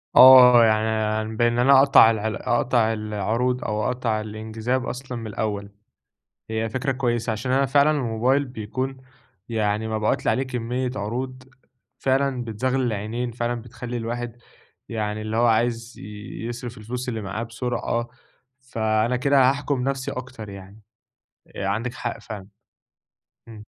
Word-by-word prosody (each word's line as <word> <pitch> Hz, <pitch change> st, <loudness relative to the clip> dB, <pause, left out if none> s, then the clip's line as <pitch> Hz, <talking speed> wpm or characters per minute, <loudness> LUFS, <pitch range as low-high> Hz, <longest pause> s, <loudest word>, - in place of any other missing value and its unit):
آه، 125 Hz, -2 st, +10 dB
يعني 110 Hz, 0 st, 0 dB
بإن 120 Hz, +1 st, +2 dB
أنا 135 Hz, +2 st, +6 dB
أقطع 135 Hz, -4 st, +7 dB
ال 110 Hz, 0 st, -2 dB
أقطع 120 Hz, -2 st, +2 dB
العروض 110 Hz, +4 st, -1 dB
أو 105 Hz, 0 st, -1 dB
أقطع 120 Hz, -3 st, -1 dB
الانجذاب 110 Hz, +4 st, -3 dB
أصلًا 125 Hz, 0 st, -5 dB
من 115 Hz, -, -6 dB
الأول، 100 Hz, -1 st, -3 dB, 0.8 s
هي 110 Hz, 0 st, -1 dB
فكرة 130 Hz, +4 st, -1 dB
كويسة 120 Hz, -3 st, -1 dB
علشان 110 Hz, +4 st, -2 dB
أنا 135 Hz, +1 st, +3 dB
فعلًا 140 Hz, +3 st, +4 dB
الموبايل 130 Hz, 0 st, +1 dB
بيكون 130 Hz, +3 st, -4 dB, 0.5 s
يعني 110 Hz, -1 st, 0 dB
مبعوت 110 Hz, -1 st, -1 dB
لي -, -, +4 dB
عليه 130 Hz, -, 0 dB
كمية 125 Hz, 0 st, -3 dB
عروض 130 Hz, +5 st, -4 dB, 0.5 s
فعلًا 135 Hz, -1 st, 0 dB
بتزغلل 130 Hz, +4 st, -1 dB
العينين، 115 Hz, +2 st, -3 dB
فعلًا 120 Hz, 0 st, -2 dB
بتخلي 120 Hz, +1 st, -7 dB
الواحد 120 Hz, +1 st, -4 dB, 0.5 s
يعني 110 Hz, -2 st, -3 dB
اللي 110 Hz, +1 st, -3 dB
هو 120 Hz, +1 st, +4 dB
عايز 115 Hz, +1 st, 0 dB, 0.5 s
يصرف 120 Hz, -1 st, -6 dB
الفلوس 125 Hz, +4 st, -5 dB
اللي 115 Hz, -3 st, -2 dB
معاه 100 Hz, +3 st, -4 dB
بسرعة، 120 Hz, 0 st, -3 dB, 0.5 s
فأنا 110 Hz, -1 st, 0 dB
كده 135 Hz, 0 st, +4 dB
هاحكم 140 Hz, -2 st, -1 dB
نفسي 135 Hz, -1 st, -2 dB
أكتر 125 Hz, -4 st, -7 dB
يعني. 100 Hz, +2 st, -11 dB, 0.8 s
آآ، 100 Hz, -, -3 dB
عندِك 115 Hz, +6 st, -2 dB
حق 120 Hz, -2 st, -4 dB
فعلًا، 105 Hz, -4 st, -8 dB, 1.0 s
إمم. 110 Hz, -2 st, -11 dB
120 Hz, 135 wpm, -24 LUFS, 110-125 Hz, 1.0 s, آه